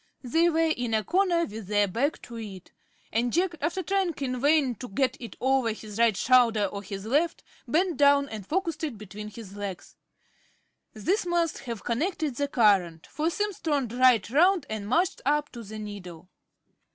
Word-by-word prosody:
They 325 +7 +3
were 325 -1 +2
in 240 -2 -1
a 215 - +1
corner 345 - +2
with 215 -2 -8
their 205 0 +2
back 265 - -1
to 235 - -10
it; 195 -5 -9 0.4
and 235 +2 +1
Jack, 350 +4 +1
after 345 +5 -1
trying 380 -2 0
in 255 -3 -3
vain 290 -3 +3
to 250 - -7
get 255 +7 0
it 230 -4 -8
over 260 -3 +2
his 215 0 -9
right 230 -4 +4
shoulder 235 -4 +4
or 200 +1 -5
his 195 0 -7
left, 300 +8 +1 0.2
bent 335 +4 +1
down 280 0 +5
and 215 -6 -8
focussed 330 -2 -2
it 285 -8 -3
between 210 +1 -8
his 210 -2 -10
legs. 200 -3 -6 1.0
This 360 - 0
must 345 -2 0
have 230 -3 -5
connected 300 +4 -1
the 285 - 0
current; 195 - +2
for 310 +2 -1
Simms 415 +2 -2
turned 280 -7 -1
right 250 -5 +4
round 345 +3 +4
and 210 -2 -4
marched 340 - +1
up 295 +2 +1
to 240 - -8
the 215 0 -8
needle. 185 -5 -8
250 Hz, 180 wpm, -27 LUFS, 210-320 Hz, 1.0 s, down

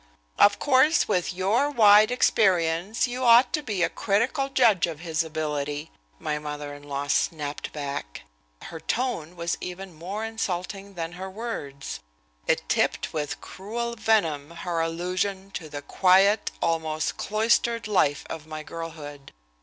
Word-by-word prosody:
"Of 205 0 +6
course, 290 +3 +4
with 180 +1 0
your 200 +10 +1
wide 215 -5 +6
experience, 190 -4 +2
you 250 +1 -4
ought 245 +1 +6
to 305 - +1
be 210 -10 -1
a - - +4
critical 235 +7 0
judge 230 -10 +4
of 160 -2 -7
his 165 -1 0
ability," 150 -1 -3 0.3
my 150 - -2
mother 150 -1 -6
in 145 - -11
law 140 -1 -4
snapped 145 0 -1
back. 140 - -5 0.4
Her 165 - -8
tone 180 -7 -2
was 170 0 -2
even 180 +1 -7
more 190 +7 -5
insulting 195 -2 -4
than 165 -1 -4
her 185 +2 -7
words. 185 - -6 0.5
It - - +1
tipped - - 0
with 150 -2 -3
cruel 235 +5 -5
venom 170 -11 +1
her 170 0 -4
allusion 185 +4 -2
to 160 -5 -6
the 145 -1 -7
quiet, 195 +5 +4
almost 160 -1 -1
cloistered 230 +2 +1
life 145 -9 +2
of 160 -1 -7
my 155 -1 -6
girlhood. 150 -4 -8
180 Hz, 145 wpm, -26 LUFS, 155-215 Hz, 0.5 s, Of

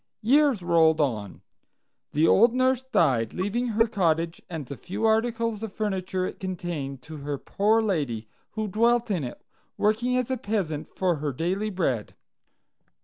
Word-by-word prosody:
Years 270 -3 +4
rolled 165 -2 +4
on. 110 -9 -2 0.7
The 155 +3 +3
old 230 +7 +5
nurse 260 0 +2
died, 135 - +1
leaving 205 +7 -1
her 225 0 +3
cottage 170 -6 0
and 160 -5 -5
the 140 - -7
few 200 - -4
articles 225 0 +1
of 225 -2 -5
furniture 190 -3 -2
it - - -6
contained 165 -8 -4
to 160 +2 -9
her 145 0 -4
poor 215 +9 +1
lady, 140 - -1 0.3
who 215 0 -2
dwelt 235 +3 +2
in 175 -7 0
it, 125 - -7 0.3
working 235 +4 +1
as 255 0 -1
a 260 - 0
peasant 190 -9 -2
for 180 -3 0
her 145 0 -2
daily 185 +10 -1
bread. 135 - -2
190 Hz, 155 wpm, -26 LUFS, 155-225 Hz, 0.7 s, old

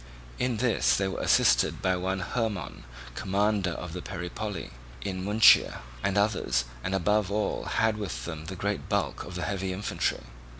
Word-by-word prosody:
In 125 -2 0
this 120 0 +3
they 95 - +1
were 95 - -4
assisted - - +4
by 95 0 +1
one 95 +1 -2
Hermon, 105 - -3 0.3
commander 100 - +1
of 90 -1 -6
the 90 - -5
Peripoli 95 +4 -5 0.3
in 95 -2 -3
Munychia, 105 +3 +5 0.2
and 95 +1 +1
others, 65 - +1 0.2
and 95 - -1
above 105 +1 +1
all 105 +1 -1
had 110 -1 +1
with 70 - -4
them 80 -1 -6
the 95 +3 -6
great 100 +3 -3
bulk - - -1
of 90 - -9
the 90 - -3
heavy 95 -1 -2
infantry. 95 +3 -1
95 Hz, 165 wpm, -28 LUFS, 90-105 Hz, 0.3 s, Munychia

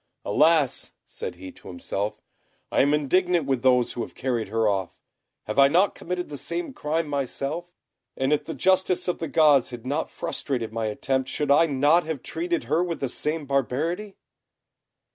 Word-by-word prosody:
"Alas!" 155 -4 +3
said 90 - -6
he 95 +1 -9
to - - -16
himself, 100 +3 -4 0.5
"I - - +4
am 140 - +3
indignant 170 +3 +2
with 135 -3 0
those 125 -1 +3
who 120 - -4
have - - -7
carried 120 -5 -1
her 110 +2 +1
off. 95 -3 -2 0.4
Have 105 +5 -2
I 140 - +8
not 180 +8 +3
committed 180 +1 -4
the 145 -2 -7
same 315 - -4
crime 160 -4 -1
myself? 145 +4 -3 0.5
and 135 +2 +1
if 150 0 +1
the 160 - -5
justice 185 +5 +2
of 180 - -1
the 165 - -3
gods 150 -3 +4
had 120 -1 -9
not 145 +5 -1
frustrated 120 -6 -3
my 115 -1 -1
attempt, 130 +4 -1
should 150 -1 0
I 165 +4 +6
not 145 +4 +3
have 155 -5 -4
treated 345 0 -2
her 170 - +1
with 170 -3 -3
the 135 - -2
same 150 +4 -2
barbarity?" 155 - -1
145 Hz, 180 wpm, -25 LUFS, 125-165 Hz, 0.5 s, I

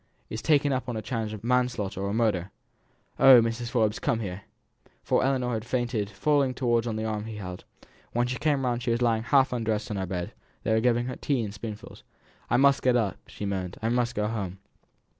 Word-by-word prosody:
"Is 110 - -4
taken 145 -2 +3
up 130 0 -2
on 120 - -3
a - - -3
charge 115 -2 -3
of 110 -1 -8
manslaughter 120 -6 0
or 100 0 -1
murder. 105 -5 +1 0.7
Oh! 130 -2 +9
Mrs. 115 +1 -1
Forbes, 110 -3 +1
come 115 - 0
here!" 100 -3 -5 0.6
For - - +2
Ellinor 130 -2 +1
had 110 -1 -2
fainted, 120 -4 -1
falling 135 +5 +1
forwards 120 -2 +1
on 115 - -2
the 110 0 -2
arm 110 -1 -2
she 110 - -6
had 105 - -7
held. 90 0 -7 0.5
When 120 +1 +1
she 125 0 -3
came 145 -3 +1
round 120 -1 0
she 125 - -2
was 115 +1 +1
lying 115 -2 +2
half 135 +2 +3
undressed 110 -3 -1
on 105 - -2
her 95 -1 -2
bed; 90 -1 -4 0.3
they 110 - +1
were 110 - +4
giving 120 +1 +2
her 125 - -5
tea 135 -5 0
in 105 - -4
spoonfuls. 105 +1 -8 0.5
"I - - +3
must 140 +1 +4
get 125 -1 +3
up," 110 -6 +1
she 105 - -7
moaned. 95 -2 -3
"I 115 - -1
must 120 0 0
go 105 - 0
home." 100 -4 -4
115 Hz, 220 wpm, -27 LUFS, 105-125 Hz, 0.7 s, Oh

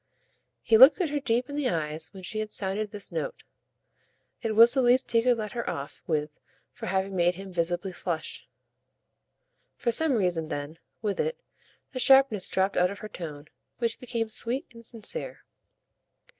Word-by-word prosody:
He 225 -1 +4
looked 270 +8 +9
at 340 -6 0
her 295 - 0
deep 245 -1 0
in 285 - -7
the 290 -3 0
eyes 160 -1 -3
when 190 -2 -11
she 215 +4 -4
had 215 0 -3
sounded 205 +1 -2
this 205 -1 -5
note; - - -4 1.0
it 225 -3 -2
was 230 +2 +8
the 265 - +2
least 250 +1 +3
he 230 -1 +4
could 245 0 +3
let 215 -2 -4
her 235 - -3
off 140 0 -6
with 150 -2 -2 0.3
for - - -8
having 190 +1 -1
made 175 0 +2
him 195 +1 -9
visibly 175 +2 -1
flush. 175 -2 -5 1.3
For 235 - 0
some 315 +4 +5
reason 180 -7 0
then, 150 +1 -5 0.2
with 205 -2 -1
it, 485 +1 -1 0.5
the 255 - -5
sharpness 265 -6 +5
dropped 190 +1 0
out 180 0 +4
of 200 - -7
her 215 - -8
tone, 155 -6 -8 0.3
which 230 -2 -1
became 230 -2 -3
sweet 240 +5 -1
and 230 0 -13
sincere. 235 - -5
215 Hz, 175 wpm, -27 LUFS, 180-245 Hz, 1.3 s, looked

